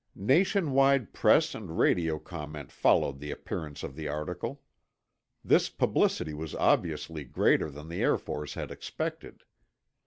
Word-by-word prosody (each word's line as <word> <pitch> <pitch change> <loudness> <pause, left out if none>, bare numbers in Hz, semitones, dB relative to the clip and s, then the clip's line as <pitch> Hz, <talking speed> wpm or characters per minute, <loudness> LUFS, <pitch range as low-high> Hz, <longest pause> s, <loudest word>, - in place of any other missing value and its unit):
Nation 160 - +2
wide 135 -2 +3
press 155 +9 +4
and 90 -7 -7
radio 80 -3 +2
comment 75 -4 -8
followed 70 -1 +2
the 75 +1 -7
appearance 75 -1 -6
of 70 - -6
the 80 0 -5
article. 75 +4 -4 0.8
This - - +4
publicity 75 - +1
was 75 0 -6
obviously 75 -2 0
greater 70 +3 +2
than 75 +2 -10
the 85 - -4
Air - - +3
Force 75 -1 -6
had - - -5
expected. - - -6
80 Hz, 135 wpm, -29 LUFS, 75-100 Hz, 0.8 s, press